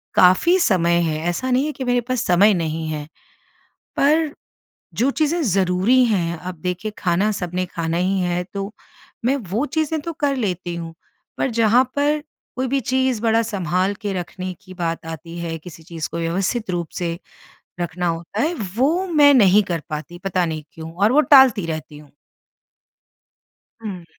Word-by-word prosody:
काफ़ी 185 Hz, -, +5 dB
समय 170 Hz, -, +3 dB
है। 155 Hz, -2 st, 0 dB
ऐसा 255 Hz, +9 st, -2 dB
नहीं 260 Hz, +4 st, +2 dB
है 305 Hz, -, -2 dB
कि 265 Hz, -, -6 dB
मेरे 245 Hz, -1 st, +1 dB
पास 250 Hz, 0 st, -2 dB
समय 195 Hz, +4 st, +5 dB
नहीं 160 Hz, -2 st, -2 dB
है। 150 Hz, -1 st, -4 dB, 0.9 s
पर 305 Hz, +2 st, +3 dB, 0.6 s
जो 255 Hz, +4 st, +1 dB
चीज़ें 315 Hz, +3 st, 0 dB
ज़रूरी 195 Hz, +4 st, +3 dB
हैं, 170 Hz, -6 st, 0 dB
अब 180 Hz, +2 st, -7 dB
देखिए 180 Hz, +4 st, -3 dB
खाना 190 Hz, +4 st, +1 dB
सबने 180 Hz, -1 st, -2 dB
खाना 165 Hz, -1 st, -3 dB
ही 190 Hz, +2 st, +1 dB
है, 175 Hz, 0 st, 0 dB
तो 200 Hz, +1 st, -4 dB, 0.5 s
मैं 265 Hz, +3 st, +3 dB
वो 230 Hz, +9 st, 0 dB
चीज़ें 315 Hz, 0 st, -1 dB
तो 335 Hz, +2 st, -5 dB
कर 285 Hz, -2 st, +1 dB
लेती 180 Hz, -7 st, -2 dB
हूँ। 165 Hz, -1 st, -6 dB, 0.4 s
पर 270 Hz, -, 0 dB
जहाँ 230 Hz, +2 st, +4 dB
पर 295 Hz, +1 st, +1 dB, 0.3 s
कोई 260 Hz, 0 st, -1 dB
भी 275 Hz, +2 st, +1 dB
चीज़ 260 Hz, -1 st, 0 dB
बड़ा 225 Hz, 0 st, +3 dB
सँभाल 185 Hz, -2 st, -1 dB
के 205 Hz, -2 st, -2 dB
रखने 185 Hz, +1 st, -5 dB
की 185 Hz, -1 st, -12 dB
बात 165 Hz, -2 st, -3 dB
आती 165 Hz, +1 st, -8 dB
है, 165 Hz, -1 st, -4 dB
किसी 165 Hz, 0 st, -12 dB
चीज़ 165 Hz, -2 st, -5 dB
को 170 Hz, -, -5 dB
व्यवस्थित 190 Hz, +6 st, -1 dB
रूप 175 Hz, -2 st, -2 dB
से 170 Hz, -1 st, -2 dB, 0.6 s
रखना 175 Hz, +1 st, -2 dB
होता 170 Hz, +5 st, -3 dB
है, 325 Hz, +5 st, +1 dB, 0.2 s
वो 325 Hz, +9 st, +2 dB
मैं 295 Hz, -4 st, +6 dB
नहीं 210 Hz, -3 st, +6 dB
कर 170 Hz, -5 st, -3 dB
पाती 155 Hz, +3 st, -6 dB
पता 185 Hz, -2 st, +1 dB
नहीं 155 Hz, -1 st, -4 dB
क्यों 160 Hz, 0 st, -9 dB
और 205 Hz, +7 st, +2 dB
वो 300 Hz, -, +6 dB
टालती 265 Hz, -, +6 dB
रहती 155 Hz, -2 st, -6 dB
हूँ। 150 Hz, -2 st, -16 dB, 1.7 s
हुँ। 185 Hz, -6 st, -6 dB
190 Hz, 170 wpm, -21 LUFS, 170-255 Hz, 1.7 s, मैं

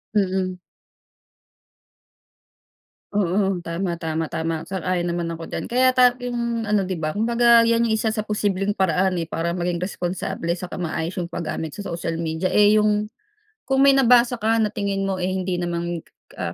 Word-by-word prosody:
Mm. 185 Hz, -2 st, 0 dB, 2.5 s
Oo, 195 Hz, -1 st, +1 dB
tama, 170 Hz, +1 st, -2 dB
tama, 160 Hz, -1 st, -3 dB
tama, 160 Hz, 0 st, -2 dB
sang-ayon 185 Hz, -2 st, -1 dB
naman 170 Hz, -1 st, -2 dB
ako 165 Hz, 0 st, -8 dB
diyan. -, -, -4 dB
Kaya 255 Hz, +2 st, +3 dB
ta 250 Hz, -1 st, +6 dB
yung 235 Hz, -1 st, -2 dB
ano, 210 Hz, -3 st, +1 dB
'di 185 Hz, -, -3 dB
ba, 155 Hz, -2 st, -2 dB
kumbaga 235 Hz, +4 st, +4 dB
yan 230 Hz, 0 st, +3 dB
yung 220 Hz, -, +2 dB
isa 220 Hz, 0 st, 0 dB
sa 215 Hz, -, -1 dB
posibleng 205 Hz, -1 st, -1 dB
paraan, 185 Hz, 0 st, +2 dB
eh, 165 Hz, -, -1 dB
para 165 Hz, +1 st, -2 dB
maging 175 Hz, 0 st, -2 dB
responsable 175 Hz, -2 st, -3 dB
saka 180 Hz, 0 st, -6 dB
maayos 170 Hz, 0 st, -3 dB
yung 175 Hz, -, -1 dB
pagamit 160 Hz, -2 st, -4 dB
sa 205 Hz, -, -7 dB
social 165 Hz, -1 st, -3 dB
media. 165 Hz, +3 st, -2 dB
Eh, 210 Hz, +1 st, +5 dB
yung 210 Hz, 0 st, +2 dB, 0.6 s
kung 270 Hz, 0 st, +3 dB
may 275 Hz, -, +7 dB
nabasa 245 Hz, -2 st, +4 dB
ka 225 Hz, +1 st, +2 dB
na 210 Hz, -, 0 dB
tingin 200 Hz, -1 st, -2 dB
mo, 195 Hz, -1 st, -2 dB
eh, 180 Hz, -, -1 dB
hindi 185 Hz, -1 st, -2 dB
naman 170 Hz, 0 st, -2 dB
ka -, -, -28 dB, 0.2 s
ka -, -, -7 dB
190 Hz, 170 wpm, -22 LUFS, 170-215 Hz, 2.5 s, may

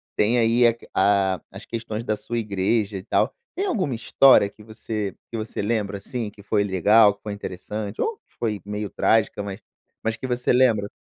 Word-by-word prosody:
tem 115 Hz, +4 st, +3 dB
aí 120 Hz, +1 st, +4 dB
a 115 Hz, -, +3 dB
que 115 Hz, -, -17 dB
a 95 Hz, -2 st, +2 dB
as -, -, -10 dB
questões 115 Hz, -1 st, -5 dB
da 110 Hz, -2 st, 0 dB
sua 115 Hz, +3 st, -5 dB
igreja 105 Hz, 0 st, 0 dB
e 95 Hz, -, -8 dB
tal. -, -, +1 dB, 0.2 s
Tem 390 Hz, -, -1 dB
alguma 185 Hz, -, -1 dB
história 115 Hz, -1 st, +5 dB
que 105 Hz, +1 st, -15 dB
você 110 Hz, -2 st, -5 dB, 0.2 s
que 115 Hz, -, -3 dB
você 110 Hz, -, -6 dB
lembra 105 Hz, -2 st, -1 dB
assim 115 Hz, +1 st, -5 dB
que 105 Hz, 0 st, -16 dB
foi 105 Hz, 0 st, +1 dB
legal, 100 Hz, +2 st, +5 dB
que -, -, -36 dB
foi 105 Hz, -, -4 dB
interessante 100 Hz, +1 st, -6 dB
ou 445 Hz, -1 st, -1 dB
que -, -, -37 dB
foi 110 Hz, -4 st, -2 dB
meio 105 Hz, 0 st, -4 dB
trágica, 110 Hz, -2 st, +2 dB
mas 100 Hz, -1 st, -6 dB, 0.4 s
mas 115 Hz, 0 st, 0 dB
que 130 Hz, -, -5 dB
você 125 Hz, 0 st, +1 dB
lembra? 115 Hz, -5 st, +3 dB
110 Hz, 200 wpm, -23 LUFS, 100-115 Hz, 0.4 s, história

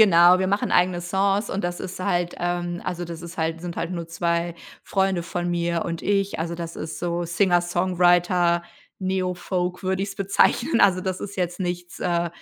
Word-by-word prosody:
Genau, 180 Hz, -3 st, +7 dB
wir 190 Hz, -, +1 dB
machen 200 Hz, +1 st, 0 dB
eigene 180 Hz, 0 st, +3 dB
Songs 195 Hz, +4 st, +1 dB
und 190 Hz, -1 st, -3 dB
das 175 Hz, 0 st, -2 dB
ist 185 Hz, 0 st, -6 dB
halt 175 Hz, -2 st, 0 dB
ähm, 175 Hz, 0 st, -2 dB
also 175 Hz, -1 st, -3 dB
das 170 Hz, -1 st, -7 dB
ist 170 Hz, +1 st, -9 dB
halt 165 Hz, +1 st, -1 dB
sind 175 Hz, -1 st, -5 dB
halt 170 Hz, +1 st, -2 dB
nur 170 Hz, -2 st, -4 dB
2 170 Hz, 0 st, -1 dB, 0.3 s
Freunde 190 Hz, -2 st, 0 dB
von 175 Hz, 0 st, -3 dB
mir 170 Hz, -1 st, 0 dB
und 165 Hz, -1 st, -4 dB
ich. 200 Hz, -1 st, 0 dB
Also 165 Hz, +1 st, -2 dB
das 170 Hz, -1 st, -6 dB
ist 155 Hz, 0 st, -5 dB
so 175 Hz, 0 st, -1 dB
Singer-Songwriter-Neo-Folk 180 Hz, +1 st, +1 dB
würde 190 Hz, +1 st, 0 dB
ich's 200 Hz, -, -4 dB
bezeichnen. 200 Hz, -, +2 dB
Also 185 Hz, -2 st, +5 dB
das 185 Hz, 0 st, -3 dB
ist 200 Hz, 0 st, -6 dB
jetzt 180 Hz, 0 st, -2 dB
nichts 175 Hz, -1 st, -4 dB
äh, 170 Hz, -1 st, 0 dB
175 Hz, 180 wpm, -24 LUFS, 170-185 Hz, 0.3 s, Genau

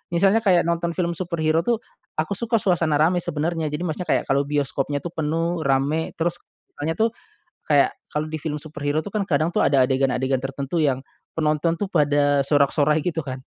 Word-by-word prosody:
misalnya 195 Hz, +5 st, +4 dB
kayak 185 Hz, -6 st, +3 dB
nonton 170 Hz, 0 st, -1 dB
film 175 Hz, -2 st, 0 dB
superhero 165 Hz, -2 st, 0 dB
tuh, 230 Hz, +6 st, 0 dB, 0.3 s
aku 155 Hz, +5 st, -2 dB
suka 235 Hz, 0 st, 0 dB
suasana 170 Hz, -7 st, +2 dB
ramai 165 Hz, +4 st, +3 dB
sebenernya, 160 Hz, 0 st, -2 dB
jadi 150 Hz, +3 st, -3 dB
maksudnya 175 Hz, +1 st, -3 dB
kayak -, -, +2 dB
kalau 140 Hz, +1 st, +2 dB
bioskopnya 145 Hz, 0 st, -1 dB
tuh 175 Hz, -, -5 dB
penuh, 165 Hz, +2 st, -1 dB
ramai, 140 Hz, +4 st, 0 dB
terus 170 Hz, +1 st, -1 dB, 0.4 s
soalnya 160 Hz, +3 st, -1 dB
tuh 225 Hz, +1 st, +2 dB, 0.6 s
kayak 145 Hz, -2 st, +4 dB, 0.2 s
kalo 150 Hz, +1 st, -1 dB
di 155 Hz, -, -3 dB
film 150 Hz, 0 st, -3 dB
superhero 150 Hz, 0 st, -2 dB
tuh 205 Hz, -, -7 dB
kan 210 Hz, 0 st, 0 dB
kadang 155 Hz, +2 st, +1 dB
tuh -, -, 0 dB
ada 135 Hz, -2 st, +4 dB
adegan-adegan 130 Hz, 0 st, +1 dB
tertentu 135 Hz, +4 st, -3 dB
yang 135 Hz, -4 st, +1 dB, 0.3 s
penonton 155 Hz, +1 st, +1 dB
tuh 205 Hz, -, -1 dB
pada 145 Hz, -2 st, +3 dB
sorak-sorai 145 Hz, +1 st, +2 dB
gitu 170 Hz, -2 st, -1 dB
kan. 130 Hz, -2 st, -7 dB
155 Hz, 180 wpm, -23 LUFS, 145-170 Hz, 0.6 s, misalnya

